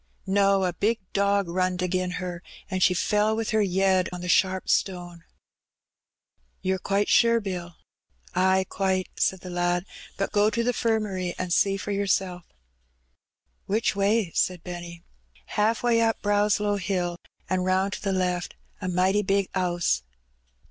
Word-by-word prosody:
'^No. 195 -1 +3
A 180 - -2
big 215 +6 +1 0.2
dog 200 -1 +2
runned 180 +1 -1
agin 180 0 -1
her, 180 -1 -5 0.3
an' 185 - -1
she 180 0 +4
fell 210 +3 +2
with 225 -1 -2
her 220 -1 +3
yed 190 -1 +2
on 180 0 -6
a - - -4
sharp 185 +1 +2
stone." 175 -3 -1 1.4
'^Yer 190 0 0
quite 200 +1 0
sure. 230 0 +4
Bill?" 180 -5 -5 0.6
''Ay, 190 +1 +3
quite," 190 -1 -1
said 190 -1 +1
the 185 - -8
lad; 175 0 0 0.3
''but 195 - -1
go 210 +1 +3
to 235 +2 -1
the 245 +1 +1
'firmary 210 -6 -1
an' 185 -1 -3
see 195 +2 +3
for 200 +1 -5
yoursel'." 190 -2 0 1.3
"Which 215 +2 +1
way?" 200 -1 +1
said 180 -2 0
Benny. 175 -1 -8 0.5
"Haaf 220 +3 +1
way 235 -1 +3
up 225 0 +1
Brownlow 205 0 +2
Hill, 175 -2 -2 0.3
an' 185 0 0
roun' 190 +1 +1
to - - -5
the 200 - -1
left; 180 -2 -1 0.3
a 185 - -3
mighty 185 +3 +2
big 195 -1 0
'ouse." 175 - 0
190 Hz, 155 wpm, -26 LUFS, 180-205 Hz, 1.4 s, she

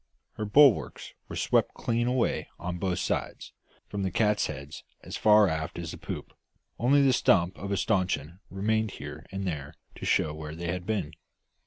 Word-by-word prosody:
Her 110 - -4
bulwarks 135 +3 +4 0.2
were - - -6
swept - - +1
clean 120 0 0
away 125 -1 0
on 90 0 -4
both 90 -1 -1
sides, - - -3 0.3
from 100 - -4
the 95 - 0
catheads 80 -9 -1 0.2
as - - -7
far 105 -1 +6
aft 80 -2 -3
as 85 -2 -5
the - - -9
poop, - - -6 0.5
only 140 +4 +4
the 135 -2 +4
stump 90 -6 +3
of 100 +1 -5
a 100 - +1
staunchion 95 -5 0
remaining 110 +3 0
here - - -9
and 95 0 -4
there 75 -6 -4 0.2
to - - -8
show 75 - +2
where 75 0 -7
they 85 0 -3
had 90 0 -5
been. 95 -9 -1
95 Hz, 175 wpm, -28 LUFS, 85-110 Hz, 0.5 s, far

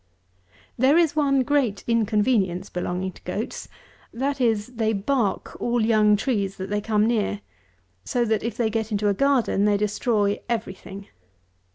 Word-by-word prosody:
190. - - -22
There 275 +5 +5
is 330 -3 +3
one 275 -3 +2
great 255 -7 0
inconvenience 210 -4 +1
belonging 180 +1 -3
to - - -18
goats; - - -5 0.4
that 275 +3 -2
is, 220 -4 +2
they 220 -1 +1
bark 210 +1 -1
all 240 -2 +1
young 215 -2 +4
trees 200 -3 -1
that 190 +1 -6
they 210 0 0
come 210 0 +1
near; 210 -3 0 0.6
so 245 -1 0
that, 220 -1 0
if 230 0 -4
they 225 -2 0
get 220 0 -2
into 205 0 +1
a - - +2
garden, 250 -4 +2
they 205 -1 +3
destroy 210 0 0
every 225 -5 -2
thing. 195 +1 -11
220 Hz, 165 wpm, -24 LUFS, 205-240 Hz, 0.6 s, There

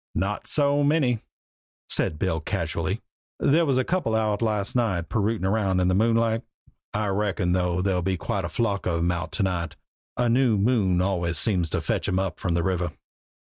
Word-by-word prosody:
"Not 100 +2 -2
so 145 -1 +2
many," 140 -6 +2 0.7
said 75 - 0
Bill 80 -1 0
casually. 80 - -2 0.4
"There 160 +3 +3
was 135 -2 +2
a 130 - +3
couple 170 -11 0
out 110 -1 0
last 105 -2 0
night 100 -9 0
pirootin' 105 -3 0
round 95 -2 +1
in 90 0 +2
the - - +2
moonlight. 115 +2 +2 0.5
I 105 -1 -1
reckon, 95 -3 0
though, 90 0 +1
there'll 95 -2 +1
be 95 +1 -1
quite 100 +2 -2
a 85 - -3
flock 100 -5 -1
of 85 -2 +1
'em 85 +1 +1
out 85 -1 -3
to 105 - +1
night. 85 -4 -2 0.4
A 125 - +2
new 120 -2 +3
moon 100 -5 +2
always 85 -4 0
seems 90 -5 +1
to - - -1
fetch - - -1
'em 90 - 0
up 95 -1 -2
from 85 -3 -1
the 85 - +1
river." 90 -2 -1
100 Hz, 190 wpm, -25 LUFS, 90-115 Hz, 0.7 s, There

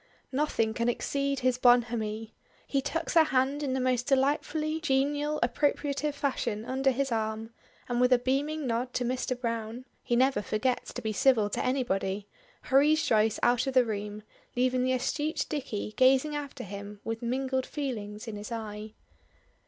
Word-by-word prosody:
Nothing 260 -6 0
can 235 +1 0
exceed 275 +2 -1
his 255 0 +1
bonhomie. 230 -3 +2 0.3
He 275 - 0
tucks 325 +4 -2
her 325 -2 +6
hand 270 +1 +1
in 275 -3 -1
the 265 - 0
most 255 -1 0
delightfully 300 +3 +1
genial, 290 +1 +1
appropriative 290 +3 0
fashion 240 -6 -2
under 265 +2 +1
his 270 0 0
arm, 220 0 -2 0.4
and 245 0 0
with 250 0 +4
a 250 - +7
beaming 280 +5 -1
nod 245 +1 -2
to 250 - +1
Mr. 255 0 -2
Browne 230 0 -3 0.2
(he 240 - 0
never 260 -3 +3
forgets 230 +5 -1
to - - -6
be 220 -1 -1
civil 220 -3 +3
to - - -1
anybody) 205 -6 -1 0.4
hurries 295 +4 +4
Joyce 220 -1 +2
out 245 +1 +3
of 265 - -2
the 255 -1 +6
room, 210 -1 -4 0.3
leaving 255 +1 +2
the 255 0 +2
astute 295 +5 -1
Dicky 255 -8 -3
gazing 265 +5 +4
after 290 -2 -5
him 200 +1 -8
with 225 0 -4
mingled 260 +2 -1
feelings 220 -6 -5
in 215 -2 -5
his 210 +3 -8
eye. 215 -1 -6
255 Hz, 165 wpm, -29 LUFS, 225-275 Hz, 0.4 s, a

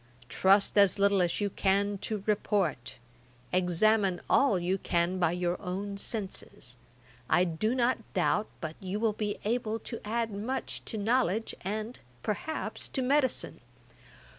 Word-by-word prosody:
Trust 195 +7 +4
as 200 -1 +5
little 200 -1 +3
as 175 -1 +1
you 205 -1 -1
can 200 +1 +1
to 210 -1 -3
report; 185 - 0 0.6
examine 185 +2 +3
all 275 -8 +4
you 180 +2 -1
can 175 +2 0
by 175 -2 +3
your 175 0 -1
own 200 +1 -4
senses. 195 - -4 0.5
I 175 +3 +4
do 180 +7 0
not 245 -1 +2 0.2
doubt 210 - +2
but 160 -2 -5
you 190 +2 -4
will 220 -1 +1
be 210 -1 -3
able 225 0 0
to 230 - -7
add 225 +1 -1
much 225 +7 -4
to 225 - -4
knowledge, 225 -1 +1
and, 215 +5 -4 0.2
perhaps, 260 +9 -3
to 265 - -2
medicine. 270 +1 +1
200 Hz, 140 wpm, -30 LUFS, 185-220 Hz, 0.6 s, as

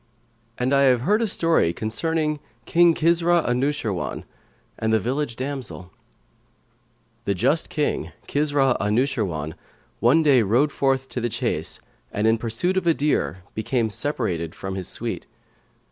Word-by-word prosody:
And 125 +2 0
I 140 - +5
have 125 -3 +4
heard 210 - +2
a 230 - +1
story 165 - +3
concerning 150 - -1 0.3
KING 170 -1 +4
KISRA 170 +1 +3
ANUSHIRWAN[FN#124] 125 -5 -1 0.6
AND 110 0 0
THE 110 - +4
VILLAGE 130 +3 -2
DAMSEL 130 -9 -5 1.3
The 100 - 0
Just 135 - +1
King, 150 -1 -1 0.2
Kisrα 145 -3 +2
Anϊshirwαn, 105 - 0 0.5
one 140 +8 +4
day 140 -5 +5
rode 120 +8 +2
forth 135 -2 0
to 125 - -4
the 120 - 0
chase 115 -9 -3 0.3
and, 105 - -1
in 110 0 +3
pursuit 120 +12 -1
of 180 -2 0
a 165 - +4
deer, 140 -10 0
became 110 +1 -1
separated 95 - -2
from 95 0 -5
his 95 -2 -4
suite. - - -4
130 Hz, 140 wpm, -23 LUFS, 110-150 Hz, 1.3 s, I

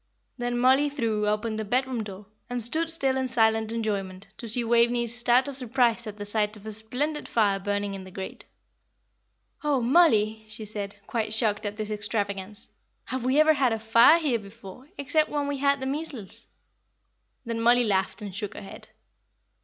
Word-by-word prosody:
Then 245 0 -2
Mollie 265 +4 +4
threw 225 -7 -1
open 215 +1 -1
the 220 - -2
bedroom 250 +1 -1
door, 200 0 -9 0.2
and 245 0 -2
stood 315 +9 +1
still 270 -5 +4
in 260 0 -1
silent 220 -2 +2
enjoyment 200 -4 -4
to 235 - -6
see 235 +2 +1
Waveney's 235 0 +2
start 245 +2 +3
of 280 - -5
surprise 245 -2 0
at 210 -1 -7
the 205 - -6
sight 210 0 -1
of 210 - -16
a 220 - -5
splendid 250 +8 -2
fire 205 -4 +1
burning 205 0 -2
in 195 -1 -7
the 185 - -11
grate. 190 0 -8 1.2
"Oh, 290 -3 +1
Mollie!" 230 -6 +3
she 215 0 -8
said, 205 -1 -5
quite 220 -2 -2
shocked 215 -2 +1
at 205 0 -6
this 215 -1 -4
extravagance, 205 0 -3 0.3
"have 260 -1 -4
we 260 +4 +2
ever 310 0 +6
had 260 -5 +2
a - - -1
fire 230 +8 +6
here 285 -8 0
before, 210 +5 -13
except 305 +2 +1
when 290 -1 -2
we 285 -1 -2
had 280 0 +2
the 265 - -4
measles?" 270 - -5 1.0
Then 230 -1 -3
Mollie 240 +1 +5
laughed 200 0 -1
and 200 -2 -7
shook 205 +1 -5
her - - -7
head. 195 - -11
230 Hz, 185 wpm, -26 LUFS, 210-260 Hz, 1.2 s, ever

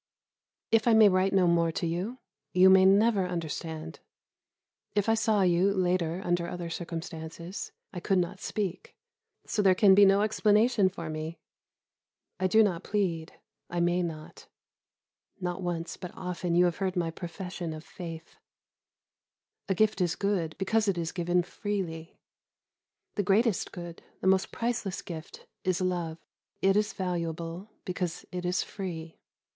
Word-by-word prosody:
If 225 +1 +3
I 235 - +6
may 220 -2 +8
write 185 +1 +2
no 190 -2 +4
more 170 -1 +3
to - - -2
you, 180 +9 -2 0.4
you 185 +1 +7
may 190 0 +7
never 200 0 +4
understand. 160 -1 -5 1.0
If 205 0 +1
I 225 - +4
saw 220 -3 +2
you, 180 +2 +3
later, 180 -2 0
under 175 -1 +1
other 175 -1 -5
circumstances, 165 +1 -6 0.2
I 180 - -4
could 190 +2 +1
not 180 +2 -1
speak; 200 -5 -4 0.5
so 210 - 0
there 190 -2 +5
can 195 0 +6
be 200 +1 +7
no 195 +1 +4
explanation 215 0 +3
for 170 -3 -7
me. 155 +1 -5 1.0
I 185 - +2
do 220 +4 +5
not 180 -5 0
plead, 175 -6 -1 0.4
I 175 - -2
may 175 +1 +2
not. 160 -3 -6 0.9
Not 180 0 -3
once, 175 -2 -3
but 180 - -7
often 180 -1 -2
you 175 +1 +6
have 175 -2 0
heard 190 -1 -1
my 170 -2 0
profession 175 0 -6
of 155 0 -7
faith 165 -2 -9 1.3
a 190 - +2
gift 215 0 +2
is 175 -2 +1
good, 190 -6 -1
because 215 +3 +1
it 195 -3 +1
is 165 -1 -2
given 175 0 +1
freely. 175 -4 -4 1.0
The 205 - 0
greatest 205 +2 +2
good, 175 -1 -8 0.2
the - - -7
most 190 0 +3
priceless 230 -5 -2
gift, 160 -2 -9 0.2
is 185 -1 +1
love. 175 -3 -1 0.4
It 195 0 +3
is 210 +1 +2
valuable 170 +1 -4 0.2
because 180 -3 -3
it 180 0 -4
is 180 +1 +1
free. 165 -5 -7
180 Hz, 150 wpm, -29 LUFS, 170-195 Hz, 1.3 s, may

